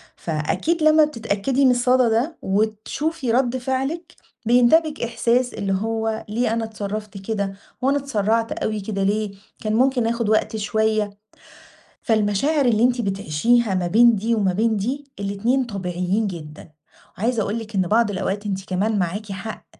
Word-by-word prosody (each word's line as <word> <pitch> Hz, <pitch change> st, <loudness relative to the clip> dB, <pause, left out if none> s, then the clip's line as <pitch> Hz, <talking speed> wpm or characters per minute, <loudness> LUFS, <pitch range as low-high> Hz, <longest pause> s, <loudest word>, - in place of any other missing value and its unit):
فأكيد 170 Hz, -, -1 dB
لمّا 310 Hz, 0 st, +6 dB
بتتأكدي 245 Hz, 0 st, 0 dB
من 255 Hz, -, +6 dB
الصدى 250 Hz, 0 st, +3 dB
ده 250 Hz, +9 st, 0 dB
وتشوفي 220 Hz, +8 st, -1 dB
رد 255 Hz, +1 st, +1 dB
فعلِك 270 Hz, +6 st, -3 dB, 0.3 s
بينتابِك 290 Hz, +7 st, +4 dB
إحساس 235 Hz, +2 st, +1 dB
اللي 195 Hz, -1 st, -2 dB
هو: 220 Hz, +2 st, -2 dB
ليه 225 Hz, +1 st, 0 dB
أنا 230 Hz, -, -1 dB
اتصرفت 210 Hz, -1 st, -6 dB
كده، 200 Hz, -1 st, -3 dB, 0.3 s
وأنا 275 Hz, +2 st, +2 dB
اتسرعت 225 Hz, -4 st, 0 dB
أوي 215 Hz, -1 st, -2 dB
كده 195 Hz, -1 st, -3 dB
ليه؟ 205 Hz, 0 st, 0 dB, 0.3 s
كان 215 Hz, -1 st, -1 dB
ممكن 250 Hz, -1 st, +2 dB
آخد 230 Hz, -2 st, -1 dB
وقت 220 Hz, 0 st, +1 dB
شويّة. 215 Hz, 0 st, 0 dB, 0.9 s
فالمشاعر 225 Hz, +7 st, +1 dB
اللي 225 Hz, -2 st, +3 dB
أنتِ 245 Hz, 0 st, +3 dB
بتعيشيها 200 Hz, +3 st, +1 dB
ما 180 Hz, -1 st, 0 dB
بين 235 Hz, +4 st, +5 dB
دي 225 Hz, +4 st, 0 dB
وما 195 Hz, -4 st, +1 dB
بين 220 Hz, +3 st, +1 dB
دي، 260 Hz, +8 st, -3 dB
الاتنين 205 Hz, +7 st, 0 dB
طبيعيين 190 Hz, 0 st, -2 dB
جدًا، 155 Hz, -3 st, -9 dB, 0.5 s
وعايزة 225 Hz, +4 st, 0 dB
أقول 215 Hz, +3 st, -2 dB
لِك 225 Hz, -1 st, -9 dB
إن 190 Hz, -, +3 dB
بعض 210 Hz, +4 st, +2 dB
الأوقات 195 Hz, +2 st, -3 dB
أنتِ 190 Hz, -1 st, -3 dB
كمان 200 Hz, +3 st, 0 dB
معاكِ 195 Hz, +4 st, -3 dB
حق 215 Hz, +3 st, -7 dB
220 Hz, 150 wpm, -22 LUFS, 200-245 Hz, 0.9 s, لمّا